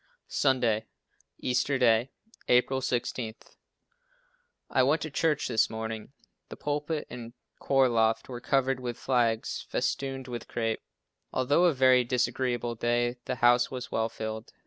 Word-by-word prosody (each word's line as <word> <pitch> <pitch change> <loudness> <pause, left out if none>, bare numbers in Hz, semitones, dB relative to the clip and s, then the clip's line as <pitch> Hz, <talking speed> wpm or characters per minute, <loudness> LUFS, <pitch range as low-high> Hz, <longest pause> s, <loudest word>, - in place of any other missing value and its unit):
Sunday, 120 -5 +1 0.5
Easter 125 +2 +1
Day, 120 0 +3 0.4
April 130 +2 +3
16. 120 -2 -2 1.4
I - - +4
went 140 +5 +3
to 155 - -5
church 155 +1 +1
this 115 -3 +2
morning. 110 +1 -5 0.4
The - - -7
pulpit 150 +1 -2
and 120 -1 -8 0.3
choir 135 -1 +3
loft 115 -2 +1
were 120 -2 -7
covered 135 -1 +1
with 120 -1 -4
flags 120 -4 0
festooned 135 -1 -2
with 120 -1 -6
crape. 115 -1 -2 0.5
Although 145 +7 +3
a 170 - +4
very 130 -1 +5
disagreeable 120 -1 -1
day, 120 +1 0
the 130 - -2
house 120 0 +5
was 125 -1 -6
well 110 0 0
filled. 110 0 -6
125 Hz, 135 wpm, -28 LUFS, 115-130 Hz, 1.4 s, very